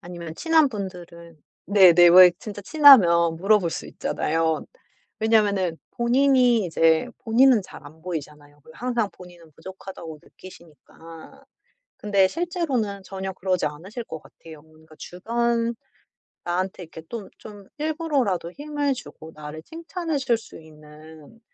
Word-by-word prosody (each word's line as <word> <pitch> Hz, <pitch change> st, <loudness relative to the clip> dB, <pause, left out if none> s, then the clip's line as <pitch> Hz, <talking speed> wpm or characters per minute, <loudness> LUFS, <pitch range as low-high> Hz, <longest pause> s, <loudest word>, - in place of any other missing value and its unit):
아니면 170 Hz, -2 st, -9 dB
친한 320 Hz, -, +3 dB
분들은 175 Hz, -5 st, -9 dB, 0.3 s
네네. 180 Hz, -3 st, +6 dB
왜 180 Hz, +1 st, +9 dB
진짜 205 Hz, -2 st, -8 dB
친하면 185 Hz, -, +6 dB
물어볼 195 Hz, -1 st, +2 dB
수 -, -, -6 dB
있잖아요. 160 Hz, 0 st, -2 dB, 0.6 s
왜냐면은 200 Hz, -6 st, +1 dB, 0.2 s
본인이 245 Hz, -2 st, +2 dB
이제 165 Hz, +4 st, +2 dB, 0.2 s
본인은 240 Hz, -1 st, +4 dB
잘 155 Hz, -, -13 dB
안 155 Hz, +2 st, -16 dB
보이잖아요, 150 Hz, -4 st, -8 dB
그 -, -, -16 dB
항상 240 Hz, -3 st, -2 dB
본인은 175 Hz, -3 st, -16 dB
부족하다고 170 Hz, -1 st, -10 dB
느끼시니까. 165 Hz, -, -16 dB, 0.5 s
근데 200 Hz, -2 st, +2 dB
실제로는 280 Hz, -, -3 dB
전혀 190 Hz, 0 st, -6 dB
그러지 185 Hz, -3 st, -1 dB
않으실 185 Hz, +11 st, -7 dB
것 160 Hz, -, -8 dB
같아요. 160 Hz, -2 st, -15 dB
뭔가 155 Hz, 0 st, -20 dB
주변 235 Hz, +4 st, -2 dB, 0.7 s
나한테 185 Hz, +1 st, -3 dB
이렇게 160 Hz, -1 st, -12 dB
또 225 Hz, -4 st, -7 dB
좀 205 Hz, -2 st, -12 dB
일부러라도 290 Hz, -, -1 dB
힘을 290 Hz, 0 st, -2 dB
주고 160 Hz, -10 st, -11 dB
나를 150 Hz, +1 st, -9 dB
칭찬해 330 Hz, -, -5 dB
줄 245 Hz, -4 st, +1 dB
수 225 Hz, -, -13 dB
있는 155 Hz, +4 st, -16 dB
190 Hz, 300 characters per minute, -23 LUFS, 165-235 Hz, 0.7 s, 왜